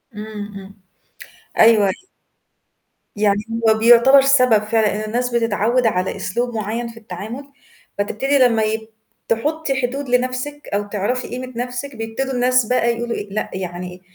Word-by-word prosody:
إمم، 210 -1 -7
إمم. 195 0 -12 0.8
أيوه، 220 -3 +6
أي - - +1 1.2
يعني 205 -1 +2 0.3
هو - - +6
بيُعتبر 240 +4 +7
سَبب 255 -6 +4
فعلًا 215 -1 +1
إن 215 - -3
الناس 245 +1 -1
بتتعوّد 230 +1 +1
على 185 -2 -1
أسلوب 240 +4 -3
معيّن 220 +3 -3
في 230 0 -11
التعامل 225 +7 -8 0.5
فتبتدّي 265 +8 0
لمّا 235 -4 +4
يب 220 +1 -2 0.4
تحُطّي 275 +3 -1
حدود 265 +2 -3
لنَفْسِك 255 +4 -1
أو 205 0 +1
تعرفي 210 +5 -2
قيمة 255 0 -6
نَفْسِك 250 +2 -4
بيبتدوا 225 +4 -4
الناس 250 -1 +3
بقى 235 0 +1
يقولوا 235 0 -3
إيه، 205 - -6
لأ، 215 - -2
يعني 180 -1 -5
إيه 180 0 -13
230 Hz, 150 wpm, -20 LUFS, 210-255 Hz, 1.2 s, بيُعتبر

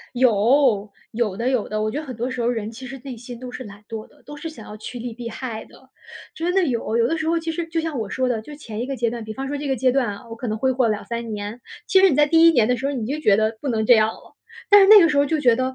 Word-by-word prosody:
有， 235 -2 +3 0.2
有 220 -4 -1
的， 235 +2 0
有 255 -5 0
的， 215 0 -2
我 215 0 0
觉 275 - -4
得 310 - -5
很 255 - -6
多 240 +3 -3
时 255 -2 -3
候 235 - +1
人 225 -3 -2
其 245 +3 -10
实 270 0 -8
内 265 -3 -7
心 240 +1 -10
都 255 -1 -7
是 255 +1 -8
懒 205 0 -12
惰 220 -2 -6
的， - - -25
都 295 - -9
是 325 - -6
想 235 -9 -12
要 210 - -9
趋 230 +3 -8
利 235 -1 -6
避 235 0 -6
害 230 -2 -6
的。 265 - -19 0.5
真 345 +2 -2
的 385 -1 +3
有， 235 -3 -1
有 235 0 +3
的 330 - 0
时 315 -1 -3
候 335 +1 +2
其 330 0 -4
实 330 +1 -3
就 330 0 -2
像 320 -4 -4
我 215 -4 -4
说 255 +3 0
的， 230 -3 -1
就 295 +6 -10
前 225 -7 -7
一 245 - -2
个 275 - -3
阶 235 -2 0
段 230 0 -5
比 220 - -6
方 270 +4 -5
说 290 - -3
这 290 +1 -5
个 270 - +1
阶 255 +2 +2
段 260 -1 +1
啊， 205 +3 -7
我 225 - -8
可 240 +1 -5
能 215 0 -2
挥 260 +3 +1
霍 255 -1 +2
两 210 -1 -1
三 235 -1 -4
年， 210 +3 -6 0.3
其 380 - +4
实 385 0 +6
你 275 - 0
在 295 - +5
第 325 +2 +5
一 - - +9
年 235 -7 +3
的 250 - +2
时 260 - -7
候， 280 - -1
你 240 -6 -3
就 285 +5 -3
觉 210 -9 +4
得 220 +1 0
不 285 - -3
能 220 -3 0
这 245 - +8
样 215 -1 +4
了， - - -15 0.3
但 410 -1 +8
是 - - +6
那 425 +1 +10
个 335 - +5
时 300 - 0
候 285 - +4
就 310 +2 -1
觉 245 -5 +4
得 255 +1 -2
245 Hz, 360 characters per minute, -22 LUFS, 225-285 Hz, 0.5 s, 那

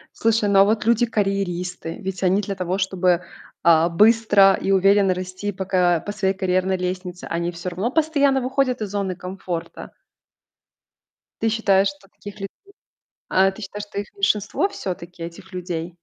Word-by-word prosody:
Слушай, 225 -2 +1
ну 195 -1 +5
а - - +9
вот 215 +2 0
люди-карьеристы? 195 -7 -1
Ведь 190 -1 -5
они 190 +2 +3
для 200 -1 -4
того, 185 0 -2
чтобы, 185 -2 +1 0.4
а, 165 0 +5
быстро 205 +1 +5
и 195 - -2
уверенно 195 0 +4
расти 185 +2 -5
по 190 -1 -5
ка 180 -3 +2
по 205 - -3
своей 195 -2 0
карьерной 185 0 0
лестнице, 180 0 -5
они 170 +1 -2
всё 175 +1 -5
равно 190 +7 -2
постоянно 285 -3 +2
выходят 255 -2 0
из 210 - -3
зоны 195 -2 -2
комфорта. 180 -2 -6 1.5
Ты 225 - +2
считаешь, 200 -3 +3
что 195 0 -14
таких 205 -1 -11
людей 195 -1 -5 0.8
а, 190 +1 +4
ты 195 - -12
считаешь, 205 +1 -6
что 200 - -5
их 205 - -7
меньшинство 205 - +1
всё-таки, 180 - -7
этих 170 +3 -10
людей? 175 -2 -5
195 Hz, 160 wpm, -22 LUFS, 180-205 Hz, 1.5 s, а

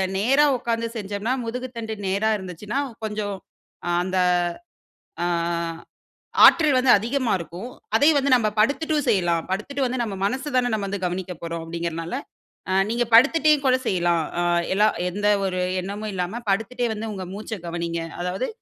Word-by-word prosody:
நேரா 265 +9 +4
உட்கார்ந்து 230 -1 -2
செஞ்சம்ன்னா 205 +2 -2
முதுகுத்தண்டு 230 -1 -5
நேரா 200 +3 +1
இருந்துச்சுன்னா 195 +6 -5 0.2
கொஞ்சம் 210 -2 -3 0.7
அந்த 185 +1 -2 1.1
ஆ - - +1 1.2
ஆற்றல் 305 -5 +6
வந்து 255 0 +3
அதிகமா 240 +3 -1
இருக்கும். 175 +8 -7 0.3
அதே 290 - +5
வந்து 280 0 +1
நம்ப 215 -3 +1
படுத்துட்டும் 295 +6 +1
செய்யலாம். 170 -4 +2
படுத்துட்டு 265 +9 -2
வந்து 250 0 -2
நம்ம 215 -4 -3
மனசு 260 +8 -1
தான 245 -1 +2
நம்ம 205 -2 -1
வந்து 200 0 -3
கவனிக்கப் 180 -1 -4
போறோம் 165 0 -4
அப்டிங்கறனால, 165 0 -4 0.6
அ - - +1 0.2
நீங்க 240 +1 +1
படுத்துட்டே 305 +6 +6
கூட 255 -1 +5
செய்யலாம். 175 -2 +2 0.2
அ - - +1 0.3
எல்லா 210 +2 +4 0.2
எந்த 205 +3 0 0.2
ஒரு 185 -1 -1 0.2
எண்ணமும் 205 +3 -5
இல்லாம 185 +6 -3
படுத்துட்டே 230 +5 0
வந்து 220 +1 -5
உங்க 190 -2 -5
மூச்ச 215 +1 -6
கவனிங்க. 170 0 -3 0.2
அதாவது 180 +8 -2
210 Hz, 145 wpm, -23 LUFS, 185-245 Hz, 1.2 s, ஆற்றல்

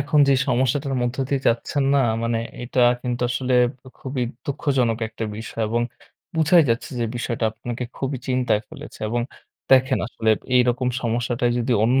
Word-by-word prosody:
এখন 150 +1 +2
যে - - +6 0.2
সমস্যাটার 135 +2 +1
মধ্য 120 +1 -1
দিয়ে 140 -2 0
যাচ্ছেন 120 +4 0
না, - - +5 0.2
মানে 115 0 0 0.2
এটা 125 +1 -1 0.2
কিন্তু 125 -1 -2
আসলে 130 +1 0 0.3
উ - - -9
খুবই 130 -1 -3 0.2
দুঃখজনক 135 -6 0
একটা 110 +1 -5
বিষয়, 110 +1 -5
এবং 120 +1 +1 0.5
বুঝাই 160 +1 +5
যাচ্ছে, 125 +7 -1
যে - - +1
বিষয়টা 120 -1 -2
আপনাকে 120 +2 -5
খুবই 135 -1 -2
চিন্তায় 125 -4 +2
ফেলেছে, - - -11
এবং 120 +2 0 0.5
দেখেন 130 0 +5
আসলে 110 -2 0 0.2
এইরকম 125 0 +3
সমস্যাটায় 120 +1 0
যদি 120 +1 0
অন্য 130 +3 +3
125 Hz, 160 wpm, -23 LUFS, 120-135 Hz, 0.5 s, যে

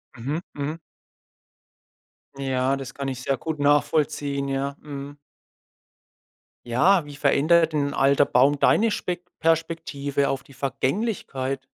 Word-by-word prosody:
Mhm 140 +7 -3
mhm. 145 +3 -4 1.6
Ja, 135 -1 0
das 135 -2 -7
kann 140 -1 -4
ich 130 -2 -4
sehr 135 +1 0
gut 155 +4 -4
nachvollziehen. 145 -1 +1
Ja, 135 +1 -2
mhm. 145 -1 -8 1.5
Ja, 150 +9 +3
wie 145 -1 -10
verändert 155 +3 +3
'n 140 -2 0
alter 140 +1 +4
Baum 140 +3 +3
deine 225 +9 +4
Spek 180 -3 -3 0.2
Perspektive 160 -4 0
auf 135 - -2
die 140 - -17
Vergänglichkeit? 135 - -2
140 Hz, 115 wpm, -24 LUFS, 135-155 Hz, 1.6 s, alter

